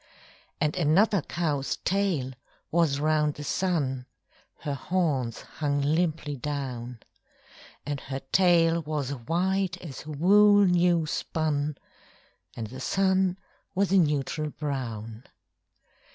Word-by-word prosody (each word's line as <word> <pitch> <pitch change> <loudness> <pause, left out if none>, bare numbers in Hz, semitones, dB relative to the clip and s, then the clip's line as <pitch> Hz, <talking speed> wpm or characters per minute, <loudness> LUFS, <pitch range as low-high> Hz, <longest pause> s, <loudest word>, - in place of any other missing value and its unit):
And 150 0 +1
another 180 +5 +3
cow's 150 -4 -2
tail 185 -9 0 0.4
was 160 -4 +2
round 150 -1 +1
the 145 - -7
sun 145 -7 -1 0.5
(Her 145 - -2
horns 140 -5 -1
hung 145 -2 -2
limply 155 -1 0
down); 125 -4 -5 0.8
And 145 -1 -3
her 135 0 -6
tail 170 -3 +4
was 150 -3 -3
white 175 +8 -1
as 155 -4 -9
wool 205 +7 +5
new 175 -2 +3
spun, 150 -2 -1 0.8
And 115 - -4
the 130 +5 -9
sun 190 +2 +2 0.4
was 195 0 +1
a 195 - +5
neutral 150 -1 0
brown. 120 -6 -5
150 Hz, 110 wpm, -27 LUFS, 140-175 Hz, 0.8 s, wool